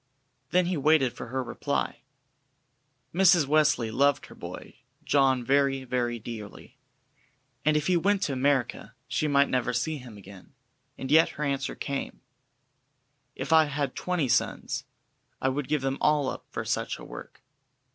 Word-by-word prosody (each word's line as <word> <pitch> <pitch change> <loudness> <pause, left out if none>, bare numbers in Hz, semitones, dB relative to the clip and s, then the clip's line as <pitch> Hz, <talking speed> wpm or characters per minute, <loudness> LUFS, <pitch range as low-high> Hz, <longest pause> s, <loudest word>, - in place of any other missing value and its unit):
Then 180 +3 +3
he 180 -1 -1
waited 145 -3 +3
for 120 - -8
her 130 +2 -2
reply. 120 - -2 1.1
Mrs. 175 -3 +5
Wesley 150 -6 +2
loved 140 +4 +2
her - - -13
"boy" - - -9 0.3
John 135 -3 +3
very, 135 0 +2
very 120 -2 -1
dearly, 115 +3 -9 0.8
and 155 +1 +3
if 150 - -1
he 180 0 +3
went 195 +3 +1
to 140 - -1
America 130 -2 0
she 140 +4 0
might 140 -1 +4
never 125 -1 0
see 155 +6 -1
him 120 -5 -11
again, 100 -1 -14 0.4
and 130 - -5
yet 160 +2 +6
her 150 - -2
answer 140 -2 -2
came: 140 -1 -4 1.1
"If - - -2
I 160 -1 +7
had 145 -2 -2
twenty 180 -6 -1
sons, 120 - 0 0.5
I 130 - +1
would 135 0 -2
give 150 -3 0
them 135 0 -1
all 150 -3 +3
up - - -7
for - - -5
such - - -2
a - - -11
work." - - -11
140 Hz, 155 wpm, -27 LUFS, 125-150 Hz, 1.1 s, I